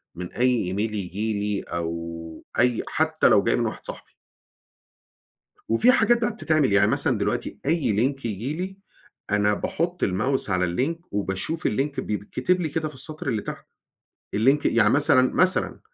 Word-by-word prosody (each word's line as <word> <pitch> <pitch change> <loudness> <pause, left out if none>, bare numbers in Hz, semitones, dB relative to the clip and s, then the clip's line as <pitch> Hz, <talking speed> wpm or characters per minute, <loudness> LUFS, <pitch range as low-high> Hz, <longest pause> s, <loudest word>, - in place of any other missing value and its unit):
من 90 0 -7
أي 125 -7 +1
email 105 +3 -1
ييجي 105 +2 -3
لي 105 -1 -1
أو 85 -1 -5 0.2
أي 120 -1 +3
حتّى - - +2
لو - - +5
جاي - - +2
من - - 0
واحد - - -5
صاحبي. - - -9 1.5
وفي 175 - +5
حاجات 240 -1 +3
بقي 240 +2 +1
بتتعمل، 155 - +1
يعني 100 - +5
مثلًا - - +1
دلوقتي - - -2
أي 145 -7 +2
link 135 +2 0
يجيلي 150 - -4 0.5
أنا 105 0 +3
باحط 175 - -2
الmouse 110 +6 -1
على 90 -1 +2
الlink 165 +6 -2
وباشوف 100 - -2
الlink 140 +6 -1
بيتكتب 125 - -1
لي 160 - -1
كده 155 +1 -2
في 150 - -11
السطر 155 +4 -6
اللي 110 -5 -1
تحت - - -7 0.7
الlink 135 +7 +4
يعني 110 -3 +4
مثلًا، 130 -1 +4
مثلًا 185 +1 +2
125 Hz, 155 wpm, -24 LUFS, 100-155 Hz, 1.5 s, لو